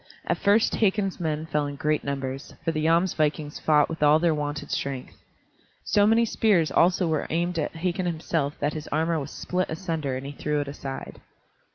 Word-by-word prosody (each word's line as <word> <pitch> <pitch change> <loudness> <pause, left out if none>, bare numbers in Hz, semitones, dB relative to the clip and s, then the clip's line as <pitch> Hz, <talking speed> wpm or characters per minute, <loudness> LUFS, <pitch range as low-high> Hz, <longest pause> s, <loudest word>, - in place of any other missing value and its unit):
At - - 0
first 205 +3 +3
Hakon's 195 -2 +1
men 155 -2 -2
fell 150 -2 -1
in 145 - -5
great 150 +2 0
numbers, 135 -1 -4
for 165 - +2
the 155 -1 -2
Jomsvikings 160 -3 +1
fought 150 -2 +4
with 165 -1 -6
all 150 +1 +6
their 165 0 +2
wonted 145 -1 -4
strength. 135 -2 -3 0.7
So 205 0 +3
many 225 +2 +4
spears 200 -8 +2
also 180 +1 +3
were 155 -2 -1
aimed 170 +1 0
at 150 - -2
Hakon 180 +2 -1
himself 160 -3 -1
that 145 +1 0
his 155 -1 -6
armor 160 +2 0
was 140 0 -5
split 185 +3 -2
asunder 160 -5 -2
and 130 - -7
he 140 - -5
threw 150 +1 -2
it 145 - -2
aside. 140 -1 -7
155 Hz, 190 wpm, -26 LUFS, 145-175 Hz, 0.7 s, all